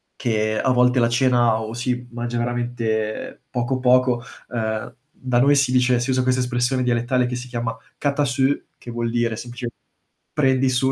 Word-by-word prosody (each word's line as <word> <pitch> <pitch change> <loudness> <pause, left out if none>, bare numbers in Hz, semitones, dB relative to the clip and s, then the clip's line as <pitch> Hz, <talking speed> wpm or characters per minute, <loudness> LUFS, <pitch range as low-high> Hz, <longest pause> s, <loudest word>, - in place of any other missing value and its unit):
che 110 -2 0
a 130 - +2
volte 125 0 +4
la 115 0 +3
cena 120 -2 +3
o 110 +1 -5
si 125 0 -2
mangia 120 0 -3
veramente 120 -3 -2
poco, 125 +1 -1
poco 125 -1 +3 0.3
uhm, 110 -2 -3 0.2
da 125 -2 -1
noi 140 +3 +5
si 135 -2 +2
dice 125 -1 +3
si 120 - -2
usa 130 0 +2
questa 130 0 +2
espressione 125 +1 0
dialettale, 125 +1 +1
che 125 - -3
si 125 +1 -6
chiama: 120 -1 -3 0.2
"Cata 145 0 0
su", 130 +1 0 0.3
che - - -11
vuol 120 0 -2
dire 120 -1 0
semplicemente 120 0 -7 0.6
prendi 130 -2 +3
su, 130 +1 +2
120 Hz, 175 wpm, -22 LUFS, 120-130 Hz, 0.6 s, noi